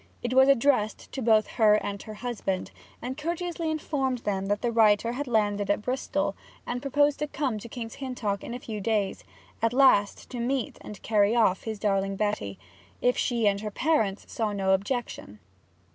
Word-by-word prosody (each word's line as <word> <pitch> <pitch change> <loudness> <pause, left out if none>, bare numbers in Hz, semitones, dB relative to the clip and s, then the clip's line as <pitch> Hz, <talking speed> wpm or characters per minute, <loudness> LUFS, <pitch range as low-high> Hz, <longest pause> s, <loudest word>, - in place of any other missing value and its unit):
It 240 +1 -1
was 265 +1 +6
addressed 255 -5 +2
to 265 - -4
both 220 -2 +4
her 215 -3 +4
and 200 -1 -3
her 215 -1 -9
husband, 210 -5 -3 0.3
and 255 +2 -3
courteously 335 +2 -3
informed 280 -4 -1
them 195 -1 -1
that 205 +3 -1
the 240 - +1
writer 225 0 +4
had 275 +3 -4
landed 205 -3 +1
at 205 +1 +1
Bristol, 255 +3 -1 0.3
and 245 0 -3
proposed 290 +1 +2
to 300 - -1
come 280 -3 -2
on 215 - -4
to 235 - -10
King's 225 -1 -6
Hintock 240 -7 -3
in 235 - -5
a - - -5
few 215 -4 -6
days, 205 -2 -1 0.4
at 230 +1 +2
last 250 -6 +4
to 245 - -5
meet 250 +1 -2
and 210 - -9
carry 210 0 +3
off 215 -5 +2
his 220 -1 -3
darling 195 -1 0
Betty, 190 - -2 0.4
if 250 0 +2
she 235 -3 +1
and 200 0 +1
her 215 - -3
parents 215 -5 0
saw 220 -2 -1
no 195 -1 +1
objection. 200 - -3
225 Hz, 190 wpm, -27 LUFS, 205-260 Hz, 0.4 s, was